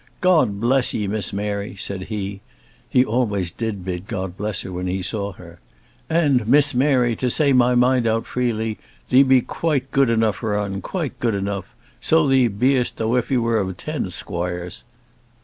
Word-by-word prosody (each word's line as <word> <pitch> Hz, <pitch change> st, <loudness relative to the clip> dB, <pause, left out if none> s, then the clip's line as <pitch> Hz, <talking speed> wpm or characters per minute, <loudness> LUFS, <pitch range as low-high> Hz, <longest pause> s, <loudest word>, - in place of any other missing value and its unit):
"God 155 Hz, -, +3 dB
bless 125 Hz, +3 st, +1 dB
'ee, 105 Hz, -, -1 dB
Miss 100 Hz, -1 st, -1 dB
Mary," 100 Hz, 0 st, -3 dB
said 95 Hz, -1 st, -4 dB
he 100 Hz, -2 st, -4 dB, 0.5 s
he 125 Hz, 0 st, +4 dB
always 105 Hz, -7 st, 0 dB
did 100 Hz, -3 st, -4 dB
bid 90 Hz, 0 st, -4 dB
God 95 Hz, -5 st, -4 dB
bless 105 Hz, -1 st, -2 dB
her 95 Hz, -, -7 dB
when 90 Hz, 0 st, -4 dB
he 95 Hz, +1 st, -2 dB
saw 100 Hz, +1 st, -3 dB
her. 85 Hz, -2 st, -14 dB, 0.5 s
"And, 145 Hz, -9 st, +2 dB
Miss 145 Hz, +3 st, +4 dB
Mary, 125 Hz, -3 st, +2 dB
to 125 Hz, -, 0 dB
say 140 Hz, +2 st, +3 dB
my 125 Hz, -1 st, +4 dB
mind 125 Hz, -1 st, +3 dB
out 115 Hz, 0 st, 0 dB
freely, 115 Hz, -3 st, -2 dB, 0.3 s
thee 130 Hz, -, +6 dB
be 135 Hz, -2 st, +5 dB
quite 135 Hz, -2 st, -2 dB
gude 135 Hz, -2 st, +3 dB
enough 110 Hz, -2 st, +2 dB
for 105 Hz, -3 st, -1 dB
un, 100 Hz, -1 st, -3 dB
quite 150 Hz, -9 st, -4 dB
gude 115 Hz, -4 st, 0 dB
enough; 100 Hz, -1 st, -4 dB, 0.2 s
so 160 Hz, -1 st, +3 dB
thee 130 Hz, -2 st, +4 dB
be'st 125 Hz, +4 st, +1 dB
tho'f 115 Hz, +2 st, 0 dB
he 135 Hz, -, +2 dB
were 115 Hz, -5 st, 0 dB
ten 145 Hz, -, -4 dB
squoires." 90 Hz, 0 st, -4 dB
115 Hz, 175 wpm, -21 LUFS, 100-130 Hz, 0.5 s, thee